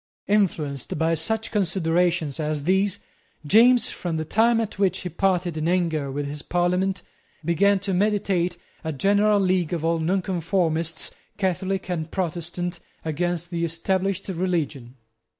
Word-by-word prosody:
Influenced 160 - 0
by 165 +1 +2
such 220 +8 -1
considerations 170 - +1
as 150 -2 -1
these, 190 +3 +2 0.5
James, 235 +9 +5
from 170 -4 -3
the 160 - -2
time 225 +6 +3
at 220 -4 -3
which 195 -2 +1
he 180 - -4
parted 180 -1 0
in 155 +1 -1
anger 165 -5 +1
with 145 +2 -3
his 145 +1 -5
Parliament, 180 +3 0 0.4
began 200 +5 +3
to 195 -1 -2
meditate 185 -3 +1 0.3
a 160 - -2
general 205 +7 +3
league 185 -3 +1
of 165 -2 -2
all 165 0 +1
Nonconformists, 170 -2 0 0.2
Catholic 190 0 -1
and 165 -3 -3
Protestant, 175 0 -3 0.3
against 175 +2 -2
the 170 -1 -1
established 185 +4 -1
religion. 165 -9 -2
175 Hz, 135 wpm, -24 LUFS, 160-195 Hz, 0.5 s, James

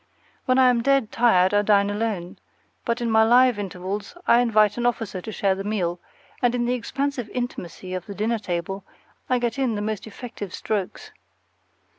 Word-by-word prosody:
When 255 -1 +3
I 255 -1 +6
am 235 -1 +1
dead 275 -3 +2
tired 190 -6 +4
I 205 - +4
dine 205 -1 +3
alone, 205 -5 -3 0.5
but 235 +1 -1
in 235 -1 0
my 220 0 +5
live 245 0 +5
intervals 200 - -5
I 235 - +5
invite 215 -3 +3
an 240 0 +1
officer 225 -6 -2
to 220 - -7
share 200 -2 +1
the 195 +1 -5
meal; 180 -4 -1 0.4
and 245 0 +2
in 240 -1 0
the 245 - +1
expansive 250 0 -3
intimacy 185 -7 -5
of 185 -1 -5
the 200 - -7
dinner 225 +3 0
table 185 0 -4 0.5
I 255 - +3
get 240 +1 -2
in 250 -5 +1
my 205 - -3
most 215 0 -3
effective 215 -3 -7
strokes. 205 -4 -4
220 Hz, 185 wpm, -24 LUFS, 200-245 Hz, 0.5 s, I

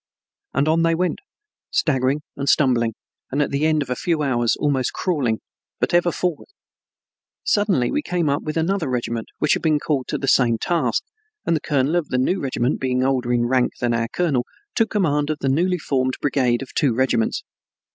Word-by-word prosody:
And 145 - +2
on 160 +1 +3
they 165 0 +3
went, 180 +2 -1 0.5
staggering 135 0 +1
and 140 -1 -2
stumbling, 120 -5 +3 0.3
and 140 - -2
at 145 - +1
the 140 +3 +1
end 155 -2 +2
of - - -15
a - - +1
few 160 +2 0
hours 120 -4 +1
almost 135 -4 0
crawling, 135 - 0 0.4
but - - 0
ever 175 0 +4
forward. 175 -2 -2 1.0
Suddenly 200 - +2
we 295 - 0
came 180 - -1
up 140 0 +1
with 155 +1 -4
another 165 -1 0
regiment 120 -2 -2
which - - +2
had - - -1
been 155 -2 +3
called 145 -3 -1
to - - -2
the 135 - -4
same 120 -3 +4
task, 170 +8 0 0.4
and 165 - +2
the 155 - -1
colonel 140 +2 +1
of 170 -4 0
the 125 - -1
new 180 +9 +1
regiment, 130 -2 -1
being 130 -1 +1
older 130 -2 +1
in 120 -1 +2
rank 125 0 +1
than 120 -1 +1
our 115 0 0
colonel, 150 -9 +1 0.3
took 225 -1 +2
command 150 -7 +1
of 155 - -1
the 135 - 0
newly 180 +6 +2
formed 130 -5 0
brigade 130 -3 +1
of 135 - -12
two 130 -6 +2
regiments. 120 -3 +1
140 Hz, 195 wpm, -22 LUFS, 125-160 Hz, 1.0 s, ever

